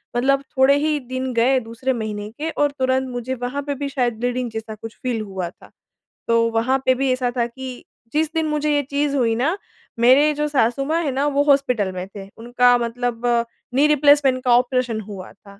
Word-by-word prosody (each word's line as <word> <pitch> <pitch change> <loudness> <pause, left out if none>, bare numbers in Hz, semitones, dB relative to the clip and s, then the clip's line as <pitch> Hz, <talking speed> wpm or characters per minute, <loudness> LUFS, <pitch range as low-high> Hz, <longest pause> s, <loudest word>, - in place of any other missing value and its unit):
मतलब 275 +3 +2 0.2
थोड़े 265 +2 +5
ही 300 0 0
दिन 260 0 -3
गए 255 +3 +3
दूसरे 230 +3 -3
महीने 210 -2 -4
के 315 +2 -3
और 290 -2 0
तुरंत 260 0 +1
मुझे 245 +1 -4
वहाँ 265 +4 -2
पे 285 0 -2
भी 280 +1 -4
शायद 250 -4 0
ब्लीडिंग 245 0 -1
जैसा 220 0 -6
कुछ 225 +1 -10
फ़ील 245 -3 -1
हुआ 190 -4 -4
था। - - -18 0.6
तो 230 0 +3
वहाँ 235 +4 +1
पे 260 - +5
भी 265 0 0
ऐसा 250 -1 0
था 235 - +2
कि 255 +1 -9 0.3
जिस 315 +1 +1
दिन 320 -1 0
मुझे 300 0 0
ये 290 - +2
चीज़ 285 0 0
हुई 230 -3 +2
ना 305 - 0 0.4
मेरे 270 +6 +5
जो 300 +1 -1
सासू-माँ 275 +4 +1
है 280 - -1
ना 275 +2 0
वो 285 0 +2
हॉस्पिटल 255 -9 +2
में 185 0 -6
थे। 195 -1 -8
उनका 245 +1 +3
मतलब 240 0 -3 0.5
नी 285 +3 +5
रिप्लेसमेंट 285 -3 +4
का 250 - +3
ऑपरेशन 250 -2 0
हुआ 195 -3 -9
था। 200 0 -18
255 Hz, 200 wpm, -21 LUFS, 230-280 Hz, 0.6 s, थोड़े